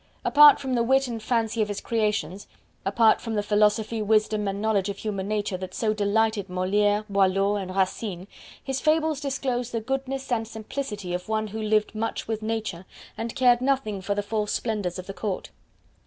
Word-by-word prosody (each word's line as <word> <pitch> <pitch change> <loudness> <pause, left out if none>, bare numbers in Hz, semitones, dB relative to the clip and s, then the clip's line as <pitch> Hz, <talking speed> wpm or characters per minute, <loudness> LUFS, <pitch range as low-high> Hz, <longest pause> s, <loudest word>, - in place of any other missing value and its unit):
Apart 295 0 +8
from 265 -1 -3
the 240 - +2
wit 265 +3 +3
and 230 -2 -5
fancy 225 0 0
of 210 - +1
his 205 -1 -4
creations 210 -5 -1 0.4
apart 220 +3 +4
from 225 -2 -4
the 205 - 0
philosophy, 210 +2 +2
wisdom, 215 0 +2
and 195 0 -2
knowledge 205 -2 +1
of 200 - -4
human 200 -3 -3
nature 205 -3 -1
that 185 0 -7
so 215 -2 +1
delighted 210 -1 +1
Moliere, 205 +3 +1
Boileau 195 0 +2
and 190 -2 -4
Racine 190 -1 -1 0.4
his 270 -1 -3
Fables 315 -1 +2
disclose 260 -3 -2
the 230 - -2
goodness 270 +3 -3
and 225 -2 0
simplicity 215 -4 -5
of 180 +3 -4
one 215 -1 -1
who 220 +2 -5
lived 215 0 +1
much 225 +1 -3
with 220 -1 -2
Nature, 215 -5 -3 0.3
and 225 0 -5
cared 245 -1 +4
nothing 255 -7 0
for 200 +2 -2
the 205 - -1
false 210 0 -2
splendors 205 -6 -2
of 185 - -7
the 195 - -7
court. 200 -2 -4
215 Hz, 185 wpm, -25 LUFS, 200-230 Hz, 0.4 s, Apart